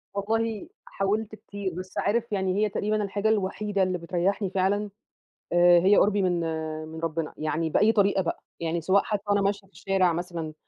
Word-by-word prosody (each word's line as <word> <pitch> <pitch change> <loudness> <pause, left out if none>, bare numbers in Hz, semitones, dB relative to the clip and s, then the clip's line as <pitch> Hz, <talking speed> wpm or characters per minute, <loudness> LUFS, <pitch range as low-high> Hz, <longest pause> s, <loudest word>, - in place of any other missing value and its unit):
والله 220 +1 -1 0.2
حاولت 210 +2 -2
كتير، 200 -3 -6
بس 185 +2 -8
عارف 230 +2 0
يعني 190 -2 0
هي 215 - +2
تقريبًا 210 +1 -1
الحاجة 205 +2 -1
الوحيدة 205 -1 0
اللي 185 -1 0
بتريّحني 180 +3 -1
فعلًا 195 +2 0 0.6
آآ 175 0 +6
هي 195 +4 +4
قربي 205 0 +3
من 175 -2 +1
آآ 160 -1 -4
من 160 +1 -8
ربنا، 165 -1 -3
يعني 155 +1 -1
بأي 210 +7 +4
طريقة 200 -3 +3
بقى 170 - -4 0.2
يعني 165 0 -2
سواء 190 +4 +3
حتّى 205 -2 -2
وأنا 205 0 +2
ماشية 200 0 -1
في 195 - -33
الشارع 190 -3 +1
مثلًا 170 -2 -4
195 Hz, 180 wpm, -26 LUFS, 170-205 Hz, 0.6 s, آآ